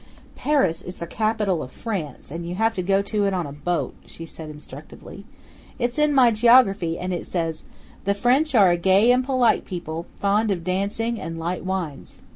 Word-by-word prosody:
"Paris 280 - +1
is 180 - -8
the 170 - -6
capital 210 -2 0
of 125 - -7
France, 170 - -5
and 170 +2 -5
you 175 - -4
have 225 +3 +1
to 185 - -2
go 195 +2 +2
to 205 0 0
it 195 - 0
on 175 -2 -1
a 140 - -7
boat," 170 +5 -2
she 165 - -9
said 160 -1 -9
instructively. 150 +6 -11 0.5
"It's 245 +2 -1
in 300 0 +4
my 250 -3 +6
geography, 215 -7 +4
and 180 0 -3
it 175 - -5
says: 165 -3 -3 0.4
'The 200 +1 +1
French 260 +7 +2
are 195 -5 +6
a 175 - +2
gay 190 +6 +4
and 250 +1 +3
polite 255 -3 +2
people, 170 -2 -6
fond 210 +2 +2
of 180 -4 -1
dancing 205 +5 -2
and 165 0 -5
light 170 +2 -3
wines.' 185 -6 -4
195 Hz, 195 wpm, -23 LUFS, 170-225 Hz, 0.5 s, my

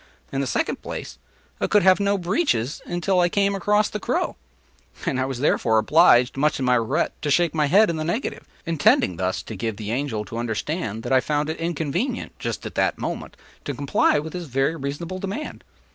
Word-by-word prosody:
In 135 - -1
the 135 - -2
second - - -1
place, - - -7 0.4
I - - 0
could 210 - +3
have 190 +1 +6
no 200 0 +2
breeches 175 - 0
until 180 +2 0
I 175 0 +4
came 200 +1 +2
across 210 +2 +2
the 210 - -5
crow. - - -1 0.7
I 130 0 0
was 130 -2 -4
therefore 110 -6 +2
obliged, 125 -1 +5
much 150 +2 +2
to 135 - -3
my 125 -1 +3
regret, 125 +7 +1
to 150 - -2
shake 170 +3 +3
my 150 -2 +2
head 205 +8 +5
in 170 - -2
the 155 - -2
negative—intending 165 - 0
thus 95 +1 -1
to 110 - -7
give 110 +1 -3
the 110 -1 -5
Angel 120 -4 -2
to 115 - -6
understand 115 - -3
that - - -1
I 130 - +6
found 150 +3 -1
it 160 - -5
inconvenient, 170 - -2
just - - -4
at - - -6
that - - +1
moment, - - -5 0.3
to 145 - -4
comply 140 +2 +2
with 155 +2 -4
his 175 -2 -5
very 135 +4 0
reasonable 165 +5 -5
demand! 200 +11 -5
150 Hz, 200 wpm, -23 LUFS, 125-180 Hz, 0.7 s, have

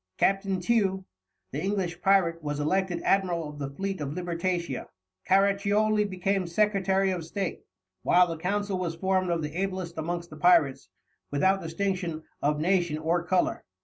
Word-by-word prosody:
Captain 195 -1 +1
Tew, 190 -2 +1 0.5
the 140 - -3
English 185 -3 -2
pirate, 175 -4 +3
was 145 -1 -3
elected 175 +3 0
Admiral 175 -5 +1
of 150 0 -9
the 140 -1 -3
Fleet 195 +4 -4
of 145 +1 -3
Libertatia, 175 -4 -2 0.4
Caraccioli 200 +2 +3
became 190 -1 -1
Secretary 195 0 +2
of 180 -3 -3
State, 190 +3 -4 0.4
while 180 0 +5
the 165 -2 -4
Council 200 +1 -1
was 170 -2 -2
formed 185 +1 0
of 170 -2 0
the 150 0 -4
ablest 185 -3 -3
amongst 170 +1 -3
the 155 - -9
pirates, 155 -4 +3 0.4
without 190 +7 +2
distinction 170 -1 -2 0.2
of 150 +1 +1
nation 175 -2 +1
or 165 +2 0
colour. 180 +1 0
180 Hz, 150 wpm, -27 LUFS, 165-195 Hz, 0.5 s, while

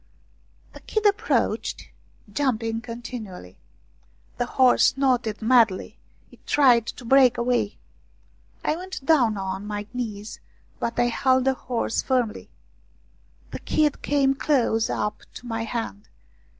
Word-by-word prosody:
The - - -11
kid 435 -1 -3
approached, 405 -1 0 0.4
jumping 230 -4 -1
continually. 230 - -8 0.8
The 245 - 0
horse 255 0 +4
snorted 245 -6 0
madly, 225 -5 +2 0.3
it - - -21
tried 245 -5 +4
to 245 - -7
break 255 0 +5
away. 235 -3 0 0.9
I 305 - +1
went 370 -4 -8
down 245 -9 +3
on 190 +1 -4
my 205 0 -4
knees, 215 -4 -5 0.4
but 230 - -3
I 240 - +3
held 260 +2 +2
the 265 - +3
horse 245 -3 -2
firmly. 245 -5 -1 1.0
The - - -6
kid 300 -2 0
came 275 -1 +2
close 245 -6 +1
up 210 - -2
to - - -10
my 225 -1 -3
hand. 220 - -5
240 Hz, 125 wpm, -24 LUFS, 220-265 Hz, 1.0 s, break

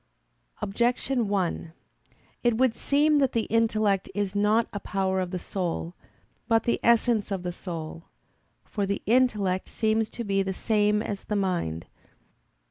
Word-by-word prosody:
Objection 240 +3 0
1: 180 -4 -1 0.7
It 240 -2 +2
would 255 -2 +3
seem 295 +1 +3
that 270 -2 +2
the 230 - +1
intellect 215 -4 +2
is 205 -1 -1
not 210 +3 +3
a 205 - -3
power 190 -1 -1
of 185 -1 -2
the 185 - -3
soul, 175 -2 -3 0.5
but 225 -1 +3
the 235 - +1
essence 235 -2 +3
of 195 -3 -3
the 175 -1 -3
soul. 165 -2 -7 0.6
For 200 -2 -2
the 200 - -2
intellect 210 -6 +2
seems 220 0 0
to 235 - -6
be 195 -2 +1
the 190 -1 -2
same 210 0 +2
as 200 -2 -5
the 210 - -2
mind. 175 - -1
205 Hz, 150 wpm, -27 LUFS, 190-230 Hz, 0.7 s, would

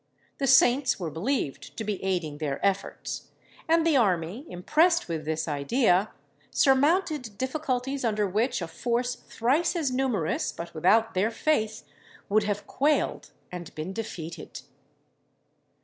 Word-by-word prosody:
The 275 - 0
saints 260 0 +5
were 170 -4 -3
believed 165 - -3
to 220 - -3
be 210 -3 -3
aiding 175 -6 -2
their 145 -3 -2
efforts, 195 0 -2 0.4
and 330 0 +3
the 320 -4 +4
army, 195 - 0
impressed 320 - +2
with 160 -3 -4
this 160 +1 -2
idea, 180 - +2 0.4
surmounted 280 - +2
difficulties 265 0 -2
under 215 -3 +1
which 210 +1 0
a - - -4
force 240 +8 -1
thrice 265 +9 0
as 310 -6 0
numerous, 250 -11 0
but 170 0 -8
without 220 +8 +3
their 190 +4 +2
faith, 225 -4 0 0.5
would 210 +1 +3
have 205 0 -2
quailed 295 +3 0 0.2
and 175 -2 -8
been 155 +5 -5
defeated. 170 -7 -6
220 Hz, 135 wpm, -27 LUFS, 180-270 Hz, 0.5 s, saints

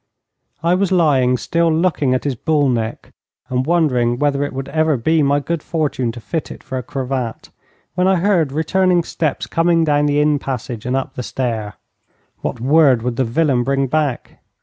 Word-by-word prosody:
I 170 +1 +3
was 190 0 +1
lying 135 -8 +3
still 170 +4 +1
looking 160 -5 +1
at 130 - -2
his 140 - -1
bull 145 +4 +1
neck, 115 -2 -3 0.4
and 130 +1 -1
wondering 125 -8 +2
whether 145 0 +1
it 145 - -3
would 135 0 -5
ever 155 -2 +1
be 160 +7 +2
my 140 0 +2
good 165 +2 -3
fortune 150 -8 -1
to 120 - -8
fit 135 +9 -4
it - - -10
for 130 - -4
a - - -4
cravat, 130 -3 -4 0.4
when 180 +1 +1
I 190 - +4
heard 175 -5 +2
returning 175 +4 +2
steps 155 -3 -2
coming 165 0 +2
down 145 -1 +2
the 145 0 +2
inn 150 -1 +2
passage 125 -4 -5
and 125 - 0
up 135 0 -3
the 125 - -5
stair. 115 -2 -3 0.7
What - - -3
word 135 -2 +4
would 125 -1 -2
the 130 - +1
villain 130 +1 +1
bring 135 +1 +1
back? 145 -2 -2
140 Hz, 190 wpm, -18 LUFS, 125-160 Hz, 0.7 s, I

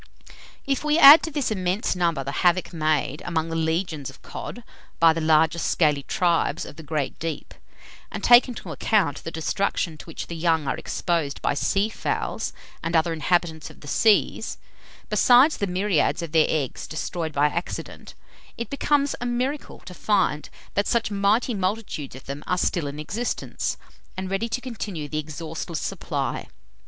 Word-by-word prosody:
If 275 0 -1
we 300 +1 +2
add 300 -1 +11
to - - -3
this 280 -5 -1
immense 190 +1 0
number, 170 -6 0
the 135 - -4
havoc 180 0 +2
made 155 -3 0
among 165 -1 -1
the 165 - -3
legions 160 -3 -1
of 135 - -15
cod 240 - -7 0.4
by 165 -1 +6
the 165 - -3
larger 160 +1 +3
scaly 150 -4 +2
tribes 170 +3 0
of - - -10
the 160 - -10
great 150 -3 -3
deep, 165 -1 -5 0.6
and - - -6
take 240 +2 +7
into 245 - -7
account 190 -11 +1
the - - -4
destruction 165 0 -2
to - - -10
which 165 - -6
the 170 - -7
young 160 -3 +1
are - - 0
exposed 165 -6 -2
by - - +2
sea 195 +8 +1
fowls 220 - -3 0.3
and 165 +1 -2
other 165 +1 +2
inhabitants 160 0 0
of - - -16
the 145 - -11
seas, 215 +7 +2 0.5
besides 255 +5 +5
the 200 - -1
myriads 180 -3 +1
of 165 - -6
their 160 -1 +4
eggs 145 -5 -2
destroyed 160 +1 -4
by 145 0 +2
accident, 170 +4 -4 0.4
it 235 - -5
becomes 285 0 +1
a 245 - -1
miracle 255 +4 -3
to 180 - -10
find 180 -7 0 0.2
that 200 - 0
such 230 -2 +1
mighty 205 +5 +2
multitudes 190 - -3
of 130 - -12
them 140 +2 -6
are 180 - +1
still 175 -4 0
in 140 +1 -6
existence, 220 +10 -3 0.4
and 190 0 -4
ready 220 +4 -1
to 235 +3 -2
continue 210 - -5
the 155 +1 -3
exhaustless 160 +2 -5
supply. - - -3
170 Hz, 170 wpm, -24 LUFS, 155-210 Hz, 0.6 s, add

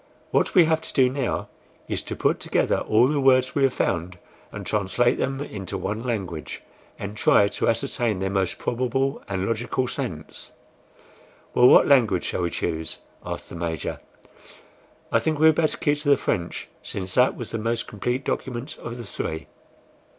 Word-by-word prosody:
What - - +1
we 180 -3 +8
have 160 0 +1
to - - -9
do 130 -2 +5
now 135 -2 -2 0.4
is - - -2
to - - -6
put - - +1
together - - +1
all 115 +4 +4
the 145 +1 +1
words 130 -1 +4
we 140 - 0
have 135 -2 +4
found, 85 +2 -1 0.3
and - - -7
translate 105 +4 +1
them 135 +1 -1
into 100 -8 -5
one 105 +4 -3
language, 95 -10 -4 0.3
and 100 +1 -6
try 100 -1 +4
to - - 0
ascertain 115 -1 0
their 95 +1 -2
most 95 -2 0
probable 130 +3 -1
and 95 -1 -1
logical 120 +3 -1
sense." 105 - -6 1.0
"Well, 125 - +7
what - - +7
language 115 -10 +4
shall - - -2
we 85 - 0
choose?" 80 -1 -3 0.3
asked - - -6
the - - -8
Major. 85 -2 -3 1.1
"I - - +4
think 155 -1 0
we 155 - +4
had 160 - +8
better 155 0 +1
keep 145 0 +1
to 145 -1 -1
the 140 - +6
French, 85 -5 -2
since 95 -1 -5
that 125 +1 +4
was 120 - -6
the 115 - -2
most 115 +1 -1
complete 125 +6 -2
document 130 +4 -3
of 120 +1 -6
the 120 - -7
three." 80 -4 -4
115 Hz, 180 wpm, -24 LUFS, 95-135 Hz, 1.1 s, we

